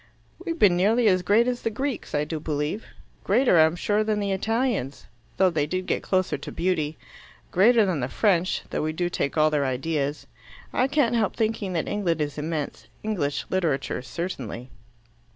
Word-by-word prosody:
"We've 335 Hz, -2 st, -3 dB
been 200 Hz, -, +5 dB
nearly 220 Hz, +6 st, +3 dB
as 185 Hz, -2 st, +4 dB
great 210 Hz, +6 st, +3 dB
as 250 Hz, -1 st, -1 dB
the -, -, 0 dB
Greeks, 260 Hz, -, -3 dB
I 145 Hz, -, +2 dB
do 155 Hz, +1 st, -4 dB
believe. 150 Hz, +7 st, -3 dB, 0.4 s
Greater, 215 Hz, -4 st, +4 dB
I'm 160 Hz, +1 st, +5 dB
sure, 205 Hz, +4 st, +1 dB
than 215 Hz, -1 st, 0 dB
the 200 Hz, -1 st, -1 dB
Italians, 220 Hz, -, -1 dB, 0.3 s
though 190 Hz, -1 st, +4 dB
they 150 Hz, -3 st, 0 dB
did 185 Hz, +3 st, -2 dB
get -, -, -1 dB
closer 185 Hz, -6 st, 0 dB
to -, -, -7 dB
beauty. 160 Hz, -4 st, -1 dB, 0.5 s
Greater 220 Hz, +4 st, +5 dB
than 180 Hz, -6 st, 0 dB
the 125 Hz, -, -1 dB
French, 185 Hz, -2 st, +1 dB
though -, -, -1 dB
we 155 Hz, +1 st, -1 dB
do 175 Hz, +2 st, -1 dB
take 140 Hz, -1 st, -2 dB
all 155 Hz, 0 st, +4 dB
their 150 Hz, -2 st, +1 dB
ideas. 140 Hz, +2 st, -2 dB, 0.5 s
I 255 Hz, -, +2 dB
can't 275 Hz, -4 st, +2 dB
help 225 Hz, -4 st, +1 dB
thinking 220 Hz, -4 st, -1 dB
that 165 Hz, -, -1 dB
England 180 Hz, -6 st, 0 dB
is 150 Hz, 0 st, -2 dB
immense. 155 Hz, -1 st, -4 dB, 0.2 s
English 170 Hz, -10 st, -1 dB
literature 160 Hz, -11 st, 0 dB
certainly." 125 Hz, -, -6 dB
180 Hz, 180 wpm, -25 LUFS, 150-215 Hz, 0.5 s, been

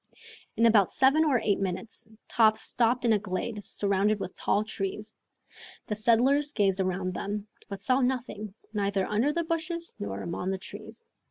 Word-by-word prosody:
In 230 Hz, -, +4 dB
about 215 Hz, -5 st, +5 dB
seven 275 Hz, +4 st, +4 dB
or 280 Hz, -6 st, +3 dB
eight 205 Hz, -2 st, +1 dB
minutes 195 Hz, +4 st, -4 dB, 0.2 s
Top 220 Hz, -2 st, +4 dB
stopped 245 Hz, +1 st, +1 dB
in 230 Hz, -, +4 dB
a 210 Hz, -, +2 dB
glade 205 Hz, +2 st, -4 dB
surrounded 200 Hz, +2 st, +1 dB
with 185 Hz, -, -6 dB
tall 210 Hz, -, +1 dB
trees. 210 Hz, 0 st, -5 dB, 0.7 s
The 210 Hz, -, -3 dB
settlers 260 Hz, +7 st, +3 dB
gazed 195 Hz, -3 st, +1 dB
around 185 Hz, -1 st, -1 dB
them, 205 Hz, +2 st, -4 dB, 0.2 s
but 200 Hz, -1 st, -7 dB
saw 255 Hz, +4 st, +2 dB
nothing, 240 Hz, -5 st, -2 dB, 0.2 s
neither 200 Hz, -2 st, 0 dB
under 225 Hz, +8 st, +1 dB
the 335 Hz, +2 st, -1 dB
bushes 335 Hz, +1 st, -2 dB
nor 100 Hz, -1 st, -4 dB
among 175 Hz, +2 st, -3 dB
the 190 Hz, -, -1 dB
trees. 335 Hz, -, -10 dB
215 Hz, 165 wpm, -28 LUFS, 195-250 Hz, 0.7 s, about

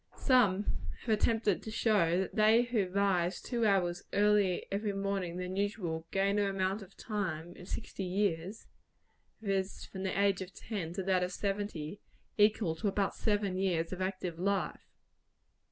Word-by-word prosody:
Some 210 Hz, -7 st, +4 dB, 0.4 s
have -, -, -8 dB
attempted 220 Hz, -2 st, +2 dB
to -, -, -7 dB
show 195 Hz, -6 st, +2 dB
that 190 Hz, -, -4 dB
they 220 Hz, +2 st, +5 dB
who 235 Hz, -6 st, 0 dB
rise 185 Hz, -2 st, +1 dB
two 235 Hz, -3 st, 0 dB
hours 180 Hz, -3 st, +2 dB
earlier 205 Hz, -3 st, +3 dB
every 205 Hz, +1 st, -1 dB
morning 195 Hz, -3 st, -2 dB
than 180 Hz, +1 st, -4 dB
usual, 180 Hz, -5 st, -2 dB
gain 200 Hz, +1 st, +1 dB
an 200 Hz, -1 st, +2 dB
amount 195 Hz, +1 st, -1 dB
of 195 Hz, 0 st, -13 dB
time 175 Hz, -6 st, -3 dB
in 180 Hz, -, -11 dB
sixty 195 Hz, -, -5 dB
years 190 Hz, +1 st, -1 dB, 0.8 s
viz., 195 Hz, -2 st, -1 dB
from 190 Hz, -, -8 dB
the 190 Hz, 0 st, -1 dB
age 200 Hz, -2 st, +3 dB
of 190 Hz, +1 st, -7 dB
ten 195 Hz, -8 st, -4 dB
to 190 Hz, +1 st, -3 dB
that 185 Hz, -1 st, +2 dB
of 180 Hz, 0 st, -1 dB
seventy 195 Hz, -4 st, -3 dB, 0.3 s
equal 210 Hz, -4 st, +3 dB
to 205 Hz, -, -1 dB
about 200 Hz, 0 st, +1 dB
seven 205 Hz, -3 st, 0 dB
years 175 Hz, -3 st, 0 dB
of 185 Hz, -, -5 dB
active 185 Hz, -3 st, -3 dB
life. 195 Hz, +2 st, -1 dB
195 Hz, 160 wpm, -32 LUFS, 180-205 Hz, 0.8 s, they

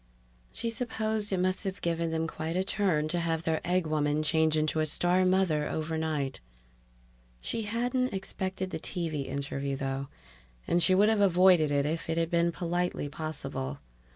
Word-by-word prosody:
She 230 Hz, -, -2 dB
supposed 220 Hz, -3 st, -2 dB
it 190 Hz, -, +1 dB
must 185 Hz, +2 st, 0 dB
have 195 Hz, -1 st, -3 dB
given 170 Hz, -1 st, -1 dB
them 160 Hz, 0 st, -1 dB
quite 165 Hz, 0 st, -4 dB
a 185 Hz, -, +2 dB
turn 185 Hz, -6 st, +1 dB
to 175 Hz, +2 st, 0 dB
have 165 Hz, -1 st, -1 dB
their 160 Hz, -1 st, 0 dB
egg 180 Hz, 0 st, +1 dB
woman 150 Hz, -1 st, +1 dB
change 160 Hz, 0 st, +3 dB
into 155 Hz, +1 st, +1 dB
a 155 Hz, -, +2 dB
star 175 Hz, +4 st, +3 dB
mother 185 Hz, -5 st, +2 dB
overnight. 155 Hz, -4 st, -2 dB, 1.0 s
She 225 Hz, -, -3 dB
hadn't 245 Hz, +3 st, 0 dB
expected 190 Hz, -1 st, -4 dB
the -, -, -3 dB
TV 160 Hz, -6 st, -3 dB
interview, 140 Hz, 0 st, -3 dB
though, 135 Hz, 0 st, -3 dB, 0.6 s
and 175 Hz, -, +2 dB
she 185 Hz, +2 st, +5 dB
would 205 Hz, +3 st, +5 dB
have 220 Hz, -2 st, +2 dB
avoided 180 Hz, -4 st, +5 dB
it 140 Hz, -1 st, +1 dB
if 160 Hz, +2 st, -2 dB
it 165 Hz, -, 0 dB
had 165 Hz, 0 st, 0 dB
been 170 Hz, 0 st, +3 dB
politely 175 Hz, -3 st, -2 dB
possible. 140 Hz, -, -5 dB
165 Hz, 170 wpm, -29 LUFS, 155-185 Hz, 1.0 s, she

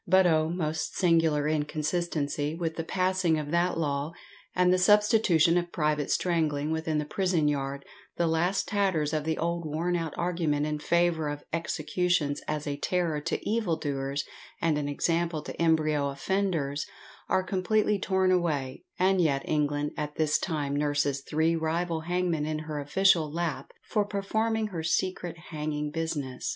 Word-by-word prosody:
But 185 Hz, +1 st, +5 dB
oh! 160 Hz, -2 st, +3 dB
most 160 Hz, -3 st, -2 dB
singular 165 Hz, -4 st, +3 dB
inconsistency, 150 Hz, -1 st, -1 dB
with 165 Hz, -1 st, -3 dB
the 165 Hz, -, -3 dB
passing 185 Hz, -2 st, +1 dB
of 150 Hz, -1 st, -4 dB
that 175 Hz, 0 st, +1 dB
law, 145 Hz, 0 st, -1 dB, 0.4 s
and 180 Hz, 0 st, +4 dB
the 185 Hz, -, +3 dB
substitution 185 Hz, -4 st, +4 dB
of 175 Hz, 0 st, -5 dB
private 150 Hz, -2 st, 0 dB
strangling 155 Hz, -4 st, 0 dB
within 160 Hz, -1 st, -1 dB
the 150 Hz, -, -1 dB
prison 180 Hz, -2 st, +1 dB
yard, 140 Hz, -1 st, -2 dB, 0.3 s
the 170 Hz, -, +2 dB
last 175 Hz, +4 st, +1 dB
tatters 190 Hz, -8 st, +1 dB
of 155 Hz, -1 st, -1 dB
the 160 Hz, 0 st, 0 dB
old 170 Hz, +1 st, -1 dB
worn 165 Hz, +3 st, -1 dB
out 165 Hz, -3 st, -3 dB
argument 165 Hz, -4 st, 0 dB
in 150 Hz, 0 st, -2 dB
favour 170 Hz, -1 st, +1 dB
of 145 Hz, 0 st, -5 dB
executions 165 Hz, -2 st, 0 dB
as 150 Hz, -1 st, -2 dB
a 145 Hz, -1 st, -3 dB
terror 165 Hz, -2 st, 0 dB
to 165 Hz, -, -3 dB
evil 215 Hz, -6 st, +1 dB
doers 140 Hz, -2 st, -2 dB, 0.3 s
and 165 Hz, -2 st, +2 dB
an 145 Hz, -1 st, -2 dB
example 165 Hz, +1 st, 0 dB
to -, -, -6 dB
embryo 155 Hz, -3 st, +2 dB
offenders, 150 Hz, -2 st, -1 dB, 0.4 s
are 185 Hz, -, +2 dB
completely 205 Hz, +2 st, +1 dB
torn 190 Hz, -1 st, +2 dB
away, 155 Hz, -8 st, 0 dB
and 185 Hz, 0 st, +3 dB
yet 140 Hz, -5 st, +1 dB
England 145 Hz, -1 st, 0 dB
at 150 Hz, 0 st, -4 dB
this 150 Hz, -1 st, +2 dB
time 145 Hz, -5 st, -2 dB
nurses 145 Hz, -1 st, 0 dB
three 160 Hz, +4 st, +1 dB
rival 165 Hz, 0 st, -1 dB
hangmen 175 Hz, -4 st, 0 dB
in 155 Hz, 0 st, -1 dB
her 155 Hz, -1 st, -4 dB
official 160 Hz, +1 st, +3 dB
lap 170 Hz, -1 st, -3 dB
for 210 Hz, -, 0 dB
performing 215 Hz, +2 st, -1 dB
her 170 Hz, -5 st, -4 dB
secret 175 Hz, +1 st, -1 dB
hanging 150 Hz, -1 st, -3 dB
business! 150 Hz, -5 st, -3 dB
160 Hz, 160 wpm, -28 LUFS, 150-180 Hz, 0.4 s, But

